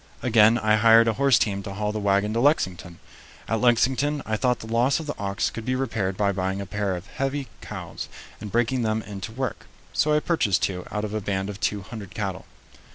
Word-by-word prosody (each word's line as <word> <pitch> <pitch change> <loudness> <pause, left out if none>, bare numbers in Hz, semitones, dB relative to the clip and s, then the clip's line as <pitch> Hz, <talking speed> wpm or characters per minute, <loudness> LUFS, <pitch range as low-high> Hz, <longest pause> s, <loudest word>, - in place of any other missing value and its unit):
Again 115 -2 +5
I 110 -1 +3
hired 115 +1 +6
a 115 - +3
horse 135 0 +4
team 100 -2 0
to 100 0 -7
haul 105 +1 -1
the 110 - -3
wagon 100 +1 +1
to 115 - 0
Lexington. 95 - +1 0.5
At 115 -1 0
Lexington 130 +4 +2
I 110 - -1
thought 125 +2 +1
the - - -10
loss 120 +7 +2
of 160 - -6
the 145 - -3
ox 100 -1 -1
could 115 - -6
be 130 +3 -1
repaired 110 -7 -2
by 100 -1 +2
buying 95 0 -2
a 100 - -4
pair 100 0 -2
of 90 +1 -7
heavy 135 +2 -3
cows - - -7 0.3
and 105 -2 -7
breaking 120 +2 +1
them 110 -1 0
in 100 -2 -8
to 110 - -5
work, 130 +1 -4 0.3
so 150 - +2
I - - +4
purchased 150 - +1
two 90 -2 -2
out 105 0 -2
of 105 - -6
a 110 - -1
band 95 0 -2
of 100 - -10
two 100 -1 -1
hundred 105 -2 -9
cattle. 95 -3 -4
110 Hz, 225 wpm, -25 LUFS, 100-125 Hz, 0.5 s, hired